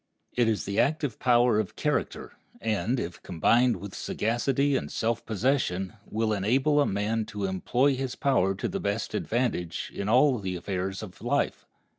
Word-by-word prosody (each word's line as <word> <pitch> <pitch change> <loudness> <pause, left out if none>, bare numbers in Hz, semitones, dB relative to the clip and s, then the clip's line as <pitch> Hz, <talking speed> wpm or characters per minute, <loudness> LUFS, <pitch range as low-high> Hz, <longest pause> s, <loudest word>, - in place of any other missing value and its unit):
It 120 -2 +2
is 110 -2 0
the 100 +1 -1
active 145 -3 0
power 120 -3 +4
of 110 - -3
character, - - -2 0.3
and, 110 +3 0
if 85 -3 -5
combined 115 +8 +3
with 100 +1 -8
sagacity 135 +5 0
and - - -2
self 115 0 -1
possession, 110 -5 0
will 110 0 0
enable 130 +9 +2
a - - +2
man 105 +3 0
to 105 -2 -4
employ 125 +9 +1
his 130 -1 -3
power 95 -9 +2
to 100 - -2
the - - -3
best 100 +2 -2
advantage 110 -9 -1
in 100 +1 -3
all 125 +1 +4
the 95 -2 -3
affairs 95 +2 -3
of 90 -4 -10
life. - - -1
110 Hz, 165 wpm, -27 LUFS, 100-125 Hz, 0.3 s, power